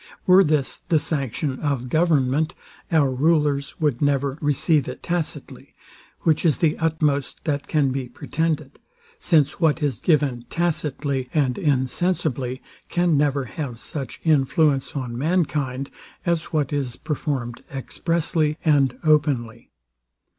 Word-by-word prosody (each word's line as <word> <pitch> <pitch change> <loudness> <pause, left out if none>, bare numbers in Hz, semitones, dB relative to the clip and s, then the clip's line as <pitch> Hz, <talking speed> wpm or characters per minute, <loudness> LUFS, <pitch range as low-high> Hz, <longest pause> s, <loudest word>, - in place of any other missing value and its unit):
Were 185 +1 +7
this 150 -4 +1
the 170 -3 0
sanction 140 -2 -2
of 140 -4 -1
government, 155 0 +2 0.4
our 150 -5 +3
rulers 145 0 +1
would 150 -5 0
never 140 0 +1
receive 145 0 +2
it - - -7
tacitly, 175 -3 -4 0.5
which 155 -2 +2
is 155 -7 +3
the 160 -3 +2
utmost 155 -4 0
that 145 -2 -1
can 145 -4 +2
be 130 -2 -3
pretended; 155 +2 -3 0.4
since 155 - +2
what 160 -2 +2
is 135 -7 0
given 140 -7 +1
tacitly 145 -6 -1
and 135 -5 +2
insensibly 135 -2 -1 0.3
can 175 -2 +2
never 140 -2 +1
have 125 -2 -6
such 135 +3 -6
influence 150 -2 +2
on 125 -4 -4
mankind, 145 -5 -1 0.3
as 170 -2 +1
what 150 -2 -1
is 135 -4 -2
performed 140 -6 -3
expressly 155 +2 -1
and 140 -5 +3
openly. 140 -7 +1
145 Hz, 125 wpm, -23 LUFS, 135-160 Hz, 0.5 s, Were